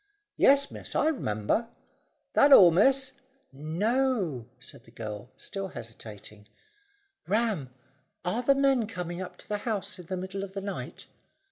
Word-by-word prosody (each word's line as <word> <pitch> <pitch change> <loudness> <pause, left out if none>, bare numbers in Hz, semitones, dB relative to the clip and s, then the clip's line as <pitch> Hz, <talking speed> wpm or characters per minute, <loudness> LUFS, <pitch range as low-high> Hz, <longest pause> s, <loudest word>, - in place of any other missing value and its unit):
"Yes, 280 +1 +4
miss, - - -7
I 310 - +3
r'member. 110 - -1 0.7
That 285 - +5
all, 185 -10 +10
miss?" 265 +9 +3 0.4
"No," 175 - 0
said 125 - -14
the - - -17
girl, 110 -1 -7
still 195 -1 -5
hesitating. 105 - -10 0.8
"Ram, 205 - 0 0.5
are 210 +7 0
the 275 +3 +4
men 270 -5 +3
coming 180 -4 -5
up 185 - -7
to - - -12
the 210 - -1
house 205 -3 -3
in 175 - -11
the 185 - -3
middle 190 +2 -5
of 195 0 -8
the 195 - -3
night?" 200 0 -6
195 Hz, 145 wpm, -28 LUFS, -, 0.8 s, all